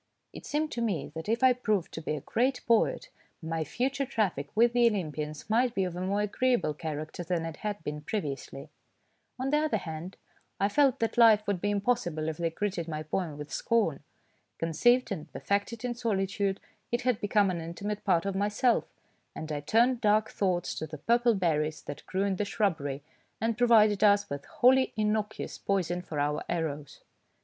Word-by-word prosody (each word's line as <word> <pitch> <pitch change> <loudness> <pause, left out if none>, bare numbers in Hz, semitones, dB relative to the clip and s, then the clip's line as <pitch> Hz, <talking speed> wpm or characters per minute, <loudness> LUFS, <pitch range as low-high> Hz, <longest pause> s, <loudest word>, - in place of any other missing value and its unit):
It - - -10
seemed 305 +1 -1
to 235 - -3
me 195 -11 -1
that 160 +5 -6
if 230 +3 0
I 260 -1 +7
proved 215 -7 -1
to 160 - -6
be 155 - -2
a 145 - -5
great 250 - 0
poet, 230 -1 +2 0.3
my 160 -1 -2
future 265 - -1
traffic 210 - -1
with 235 +2 +4
the 240 -1 +5
Olympians 155 -7 -3
might 235 +2 +2
be 195 - +2
of 180 -2 -3
a 180 - -4
more 200 +2 0
agreeable 230 -5 +1
character 155 +2 -5
than 170 -1 -1
it 165 -2 -6
had 205 -4 -4
been 150 0 -4
previously. 145 -4 -5 0.7
On 260 +2 -2
the 300 - +4
other 310 0 +1
hand, 165 +3 -7 0.4
I 200 - +2
felt 275 +3 +3
that 225 +1 0
life 220 -2 +7
would 200 -4 -1
be 205 - 0
impossible 200 -7 0
if 155 - -5
they 170 -1 0
greeted 180 -1 -3
my 155 -1 -4
poem 155 -1 -3
with 150 0 -8
scorn. 220 - +1 0.6
Conceived 240 +11 +2
and 160 -5 -5
per - - -7
fected 210 +4 -1
in 245 - -1
solitude, 200 -4 -1 0.3
it 240 +1 0
had 250 -3 +1
become 205 -1 +3
an 175 - -3
inti 165 +3 -7
mate 210 0 -3
part 175 -3 +2
of 195 - -1
myself, 210 +5 +1 0.5
and 155 0 -6
I 150 - -2
turned 235 - +2
dark 215 0 +3
thoughts 180 -3 0
to 155 - -4
the 155 0 -8
purple 235 - +3
berries 155 -4 0
that 145 - -8
grew 190 +1 0
in 195 -2 0
the 210 - 0
shrubbery, 155 -10 -1 0.4
and 225 +1 0
provided 215 -4 +5
us 205 -3 +4
with 140 0 -5
wholly 260 +1 +3
innocuous 215 0 -1
poison 180 -3 -1
for 155 -4 -5
our 150 +1 0
arrows. 150 -4 -3
200 Hz, 190 wpm, -29 LUFS, 160-230 Hz, 0.7 s, I